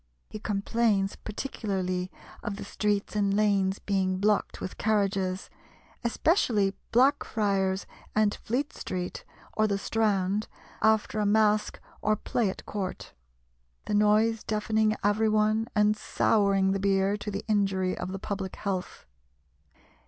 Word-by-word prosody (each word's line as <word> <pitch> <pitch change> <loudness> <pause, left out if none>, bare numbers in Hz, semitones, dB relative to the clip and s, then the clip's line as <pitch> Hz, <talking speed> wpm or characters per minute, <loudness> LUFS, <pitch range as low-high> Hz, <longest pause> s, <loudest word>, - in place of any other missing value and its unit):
He 215 - -6
complains 205 -1 0
particularly 190 -6 -3 0.3
of 210 -4 -4
the - - -7
streets 205 0 -1
and 200 -1 +2
lanes 200 -2 +2
being 190 -2 0
blocked 205 +2 +1
with 185 - -6
carriages, 195 -3 0 0.6
especially 230 - +2 0.2
Blackfriars 205 -7 +2 0.3
and 215 -1 +3
Fleet 265 +6 -2
Street 180 -1 -5 0.3
or 215 0 +2
the 200 -1 0
Strand 205 -1 0 0.3
after 220 0 +2
a 210 - +1
masque 210 0 +2 0.2
or 215 0 +2
play 215 0 0
at - - -7
court; 195 -3 -5 0.7
the - - -3
noise 210 +2 +3
deafening 215 0 +1
every 210 +2 +3
one 215 +1 +2
and 210 0 +4
souring 200 -2 +2
the 195 - 0
beer, 195 0 +2
to 210 - -5
the 200 0 -4
injury 195 -3 +1
of 185 - -5
the 195 - -4
public 195 -1 -4
health. 190 -3 -4
205 Hz, 130 wpm, -28 LUFS, 195-215 Hz, 0.7 s, and